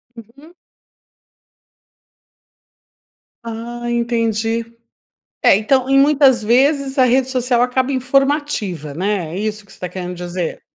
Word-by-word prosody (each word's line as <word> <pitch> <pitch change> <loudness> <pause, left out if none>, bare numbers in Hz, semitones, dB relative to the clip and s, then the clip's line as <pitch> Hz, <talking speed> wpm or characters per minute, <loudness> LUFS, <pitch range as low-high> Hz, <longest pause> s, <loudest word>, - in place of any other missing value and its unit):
Uhum. 240 +9 -15 2.9
Ah 235 +1 -6
entendi, 230 -1 -1 0.8
é - - +6
então 255 +5 +1
em 275 0 +5
muitas 275 -3 +4
vezes 270 +4 +2
a 260 - +5
rede 255 +1 +2
social 250 -2 +1
acaba 255 +2 0
informativa, 260 - -1
né, 180 -1 -2
é - - -4
isso 215 0 -4
que 200 - -20
você - - -14
está 180 - -6
querendo 180 0 -6
dizer? 175 -1 -5
235 Hz, 115 wpm, -18 LUFS, 210-265 Hz, 2.9 s, é